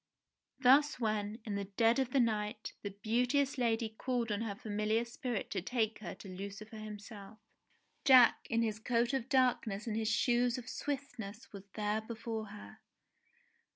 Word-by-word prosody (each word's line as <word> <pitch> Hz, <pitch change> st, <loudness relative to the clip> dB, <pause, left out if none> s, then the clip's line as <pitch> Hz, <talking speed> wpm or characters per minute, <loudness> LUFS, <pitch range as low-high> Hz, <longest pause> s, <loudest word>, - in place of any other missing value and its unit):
Thus 275 Hz, +2 st, +5 dB
when, 215 Hz, -2 st, -1 dB
in 210 Hz, -, -3 dB
the 200 Hz, 0 st, -2 dB
dead 225 Hz, +5 st, +2 dB
of 265 Hz, -2 st, +1 dB
the 270 Hz, -, +2 dB
night, 215 Hz, -2 st, -1 dB
the 205 Hz, -, -4 dB
beauteous 245 Hz, +7 st, +1 dB
lady 230 Hz, -1 st, +1 dB
called 235 Hz, +1 st, -2 dB
on 205 Hz, +1 st, -1 dB
her 215 Hz, -3 st, -3 dB
familiar 215 Hz, +2 st, 0 dB
spirit 240 Hz, -2 st, -4 dB
to 190 Hz, -, -1 dB
take 220 Hz, +1 st, -1 dB
her 210 Hz, -, -6 dB
to -, -, -11 dB
Lucifer 200 Hz, +4 st, -7 dB
himself, 210 Hz, -1 st, -9 dB, 0.7 s
Jack 260 Hz, -5 st, +7 dB
in 230 Hz, 0 st, +2 dB
his 215 Hz, -1 st, -1 dB
coat 235 Hz, +3 st, +1 dB
of 265 Hz, -2 st, -1 dB
darkness 245 Hz, -6 st, +2 dB
and 220 Hz, -3 st, -2 dB
his 220 Hz, -1 st, 0 dB
shoes 240 Hz, +1 st, +2 dB
of 245 Hz, -1 st, -8 dB
swiftness 245 Hz, -7 st, -5 dB
was 200 Hz, 0 st, -10 dB
there 210 Hz, 0 st, 0 dB
before 220 Hz, -1 st, -5 dB
her. 100 Hz, -, -11 dB
225 Hz, 160 wpm, -34 LUFS, 210-245 Hz, 0.7 s, Jack